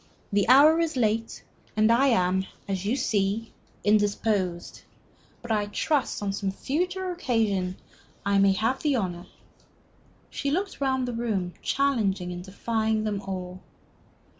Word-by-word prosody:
The 200 +1 +2
hour 300 +5 +7
is 325 -4 0
late, 225 -1 0 0.3
and 215 +1 +4
I 255 +4 +4
am 190 -5 +2 0.2
as 195 -1 -3
you 230 - +2
see 210 -2 -1 0.3
indisposed. 205 -4 0 0.6
But 240 - -5
I 210 -2 +1
trust, 265 +2 -1
on 200 -1 -1
some 195 0 -2
future 360 - -2
occasion, 215 - 0 0.5
I 200 0 +3
may 195 0 +5
have 225 +7 0
the 295 -3 +1
honor 180 -6 -3 0.5
" - - -33
She 280 - -2
looked 375 +2 -2
round 260 -2 +1
upon 235 -1 -3
them, 185 -4 -1
challenging 210 -10 0
and 175 0 -7
defying 220 +3 -1
them 205 -2 -2
all. 185 -1 -6
215 Hz, 140 wpm, -26 LUFS, 195-260 Hz, 0.6 s, hour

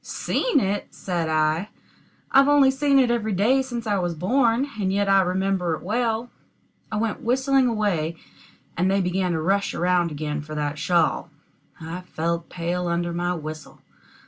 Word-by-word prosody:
"Seen 485 -12 0
it!" 200 -2 -2
said 175 -4 -2
I; 155 +5 +1 0.6
"I've 275 +1 +6
only 285 -2 +5
seen 275 +1 +2
it 255 -3 +4
every 220 -3 -1
day 230 +8 +3
since 240 -3 -5
I 205 -2 +1
was 175 -2 -2
born, 235 - +2
and 190 -2 0
yet 200 +1 +1
I 195 0 +5
remember 185 -2 0
it - - -11
well." 230 +3 -1 0.6
I - - -2
went 225 +4 -2
whistling 265 +2 +2
away, 195 -8 0 0.6
and 180 +2 +1
they 195 +1 +2
began 180 -1 0
to 160 - -1
rush 200 +3 0
around 175 -1 +2
again 150 0 -3
for 155 +1 -8
that 150 0 -2
shawl. 170 -1 +1 0.5
I 165 +2 -6
felt 170 -1 -3
pale 175 +1 -2
under 170 0 -1
my 175 +1 -1
whistle. 155 -1 -8
190 Hz, 170 wpm, -24 LUFS, 170-230 Hz, 0.6 s, I've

